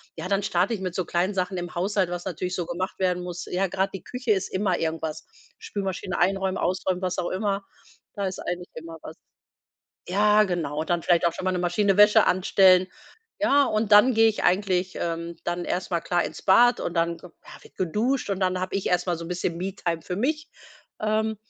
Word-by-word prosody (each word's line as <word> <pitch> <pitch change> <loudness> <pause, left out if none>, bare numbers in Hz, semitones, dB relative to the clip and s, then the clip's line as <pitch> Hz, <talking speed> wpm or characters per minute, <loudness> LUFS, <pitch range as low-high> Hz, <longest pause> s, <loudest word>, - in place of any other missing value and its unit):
ja, 165 +2 -5
dann 200 0 0
starte 185 +3 +1
ich 195 - -4
mit 185 -2 -3
so 185 - -1
kleinen 180 +4 0
Sachen 185 0 -2
im 175 0 -6
Haushalt, 190 0 0
was 175 +1 -5
natürlich 180 0 -3
so 175 - -2
gemacht 180 +3 -4
werden 180 -1 0
muss. 180 -1 -6
Ja, 190 +2 -1
grad 190 +2 -1
die 190 - -7
Küche 250 -2 -3
ist 190 -3 +1
immer 190 -2 0
irgendwas 160 -1 -3 0.3
Spülmaschine 190 -2 -4
einräumen, 190 +1 +1
ausräumen, 185 0 -1
was 185 -1 -2
auch 175 - -1
immer, 195 +1 -1 0.5
da 200 -1 -2
ist 185 - -5
eigentlich 175 0 -5
immer 165 0 -8
was. - - -9 0.9
Ja, 210 +3 +4
genau. 160 -5 -2
Dann 175 0 -1
vielleicht 170 0 +2
auch 170 - +2
schon 185 - -6
mal 185 - +2
'ne 180 - -1
Maschine 195 +3 +1
Wäsche 210 0 +7
anstellen, 185 0 +4 0.5
ja, 285 -2 +4
und 215 -1 -1
dann 220 +4 +7
gehe 225 0 +5
ich 215 - -5
eigentlich 185 0 +1
ähm, 170 0 -4
dann 175 0 -3
erst 185 +1 -2
mal, 170 -1 0
klar, 175 0 0
ins - - -7
Bad 240 +5 +5
und 175 - -3
dann, 170 0 0
ja, 180 - -12 0.3
wird - - -19
geduscht 210 +7 -1
und 195 0 -2
dann 185 0 +1
habe 185 - -4
ich 195 - -3
erst 180 0 +1
mal 175 -2 -1
so 170 - -6
'n - - -8
bisschen 175 -1 -2
Me-Time 180 -3 -3
für 180 +3 -5
mich. 305 +7 -1 0.5
Ähm, 215 0 0
185 Hz, 210 wpm, -25 LUFS, 175-200 Hz, 0.9 s, Wäsche